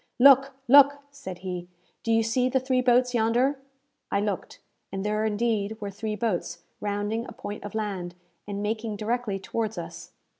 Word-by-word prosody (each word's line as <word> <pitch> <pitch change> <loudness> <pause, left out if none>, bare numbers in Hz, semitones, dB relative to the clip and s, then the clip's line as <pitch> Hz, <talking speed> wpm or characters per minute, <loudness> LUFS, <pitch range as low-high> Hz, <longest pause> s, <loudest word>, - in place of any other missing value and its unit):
"Look! 275 +1 +7
look!" 285 +2 +8
said 275 -11 -8
he. 180 -1 -4 0.3
"Do 230 - -1
you 225 0 +4
see 250 +3 +1
the 265 +1 +2
three 255 0 +1
boats 250 0 +3
yonder?" 245 +4 +2 0.5
I 200 - +2
looked, 205 -3 -3 0.3
and 195 +1 -4
there 215 +1 0
indeed 215 -1 0
were 205 -2 -4
three 215 +2 -4
boats 185 -5 -2 0.2
rounding 205 +3 -2
a - - -9
point 210 -4 -7
of 205 +1 -7
land, 190 -5 -3 0.3
and 205 0 -3
making 220 0 -2
directly 220 -1 -1
towards 220 +3 -3
us. - - -8
220 Hz, 165 wpm, -27 LUFS, 205-245 Hz, 0.5 s, look